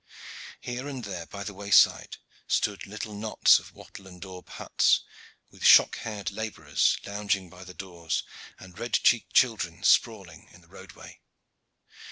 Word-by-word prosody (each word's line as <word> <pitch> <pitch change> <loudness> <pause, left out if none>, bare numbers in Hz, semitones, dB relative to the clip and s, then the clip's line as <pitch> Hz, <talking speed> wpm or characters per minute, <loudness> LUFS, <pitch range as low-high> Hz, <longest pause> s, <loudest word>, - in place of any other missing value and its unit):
Here 125 +3 -6
and 135 -4 -6
there 90 -5 -7
by 100 0 -8
the 100 - -7
wayside 100 +1 +3 0.3
stood 100 -1 -1
little 105 +1 -7
knots 105 +1 +3
of - - -15
wattle 95 - -13
and 90 -1 -14
daub 90 -1 -11
huts - - +1 0.5
with - - -13
shock - - +6
haired 105 -3 -5
laborers 100 -9 -1
lounging 100 -3 -3
by 90 +1 -13
the 90 0 -12
doors 85 -4 -4 0.3
and 95 +1 -14
red 120 -1 -6
cheeked 120 - +2
children 100 -8 +1
sprawling 95 -6 +1
in 90 - -18
the 85 - -24
roadway. 95 0 -14
100 Hz, 150 wpm, -27 LUFS, 90-110 Hz, 0.5 s, shock